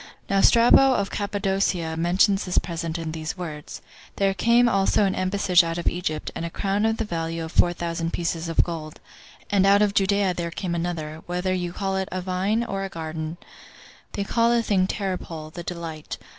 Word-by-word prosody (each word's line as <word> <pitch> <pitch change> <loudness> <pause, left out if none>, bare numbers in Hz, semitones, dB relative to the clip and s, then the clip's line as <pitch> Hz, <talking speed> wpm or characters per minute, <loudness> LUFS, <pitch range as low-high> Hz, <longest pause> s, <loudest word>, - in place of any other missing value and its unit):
Now 195 0 +3
Strabo 250 +4 +6
of 200 -3 -1
Cappadocia 195 -5 -1
mentions 185 +4 +2
this 180 - -2
present 165 -1 -2
in 165 -1 -4
these 160 +2 -5
words: 155 -4 -7 0.3
"There 195 -1 +2
came 235 +5 +4
also 195 -1 +3
an 190 - +1
embassage 185 -1 +3
out 165 0 -3
of 175 - -4
Egypt, 165 -4 -2
and - - -5
a 170 - -3
crown 200 +5 0
of 225 0 0
the 225 - -2
value 165 -3 -3
of 160 - -8
four 175 - +4
thousand 170 -1 -3
pieces 165 -1 -2
of 165 - +3
gold; 160 -3 -6 0.5
and 200 -2 +4
out 200 +1 +5
of 205 -1 +1
Judea 200 -1 +2
there 170 -1 -3
came 170 +1 -4
another, 165 -2 -3
whether 180 +1 -1
you 175 -1 -2
call 195 +1 -2
it 190 0 -2
a 185 - -2
vine 190 +5 0
or 195 -4 -3
a 195 - -4
garden; 160 -1 -5 0.8
they 200 - -2
call 230 +3 +2
the 235 -1 +2
thing 190 -4 +2
Terpole, 175 -6 -4
the 175 - -7
Delight. 165 -3 -6
180 Hz, 195 wpm, -24 LUFS, 165-200 Hz, 0.8 s, Strabo